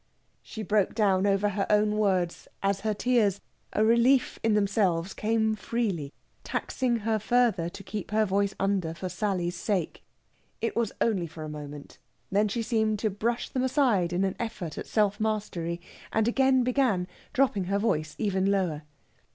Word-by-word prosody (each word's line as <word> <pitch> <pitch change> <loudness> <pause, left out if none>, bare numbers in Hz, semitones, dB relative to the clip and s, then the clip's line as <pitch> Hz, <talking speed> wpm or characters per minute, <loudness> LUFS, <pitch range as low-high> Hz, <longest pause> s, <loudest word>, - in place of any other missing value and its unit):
She 220 - -7
broke 205 0 +1
down 200 -3 +3
over 200 +1 +2
her 200 0 -1
own 210 0 +3
words, 190 -5 0 0.2
as 195 0 +1
her 215 +1 -1
tears, 210 -4 +2 0.3
a 215 - +2
relief 235 +3 +3
in 225 -1 +2
themselves, 195 -4 +1
came 220 0 +1
freely, 200 -11 -2 0.3
taxing 240 -4 -1
her 220 -1 +1
further 225 -6 +2
to 195 - -10
keep 195 +1 -5
her 215 +1 +2
voice 200 0 0
under 190 -5 0
for 185 +2 -5
Sally's 180 -1 -1
sake. 180 -2 -2 0.6
It 230 - -2
was 230 -3 0
only 195 -7 +1
for 155 0 -9
a 155 - -5
moment; 145 -1 -9 0.3
then 205 +2 +3
she 230 +3 -2
seemed 220 -2 +1
to 215 0 -1
brush 230 +5 -2
them 255 - -1
aside 255 - +2
in 180 +2 +1
an 190 -1 0
effort 215 -9 -4
of - - -6
self 205 -1 +1
mastery, 205 -6 -2 0.3
and 220 0 +2
again 265 +1 +3
began, 245 -8 +2 0.3
dropping 250 -8 +2
her 195 +2 0
voice 160 -8 0
even 195 -3 +1
lower. 180 -7 0
205 Hz, 170 wpm, -28 LUFS, 185-225 Hz, 0.6 s, down